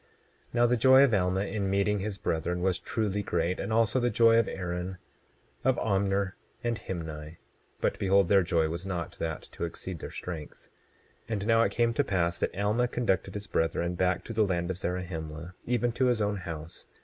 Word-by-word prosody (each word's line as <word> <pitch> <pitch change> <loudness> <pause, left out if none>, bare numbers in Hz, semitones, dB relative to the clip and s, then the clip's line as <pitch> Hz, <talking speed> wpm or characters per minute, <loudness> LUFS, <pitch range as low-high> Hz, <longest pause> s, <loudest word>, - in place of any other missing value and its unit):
27:19 - - -35 0.5
Now 120 0 +5
the 120 +1 +3
joy 130 +3 +7
of 130 -5 +3
Alma 95 -1 +2
in 100 -1 -2
meeting 100 +1 +2
his 100 0 -3
brethren 90 0 -1
was 95 -1 +1
truly 105 -3 -1
great, 90 -2 -1
and - - -3
also 115 +3 +3
the 120 0 +2
joy 115 +1 +5
of 115 - +2
Aaron, 90 0 -4 0.7
of 130 -1 +3
Omner, 100 -1 +1 0.3
and 120 -1 -1
Himni; 80 -4 -6 0.4
but - - 0
behold 95 -1 +4
their 100 +1 +5
joy 85 -2 +1
was 85 +3 -4
not 90 -3 -4
that 80 -2 -3
to - - -6
exceed 85 +1 -5
their - - -6
strength. 80 -4 -7 0.6
27:20 115 - -3
And 100 -2 -2
now 115 0 +4
it - - +2
came 120 -1 +2
to - - +2
pass 85 -3 0
that - - -2
Alma 105 +5 +2
conducted 95 -6 -1
his 105 0 -4
brethren 85 -1 0
back 90 0 +1
to 115 - -6
the 110 0 +3
land 90 -2 0
of 90 - -4
Zarahemla; 85 -2 -4
even 120 0 +1
to 130 +2 +1
his 120 -2 +2
own 105 -1 0
house. 80 -3 -7
95 Hz, 200 wpm, -29 LUFS, 85-110 Hz, 0.7 s, joy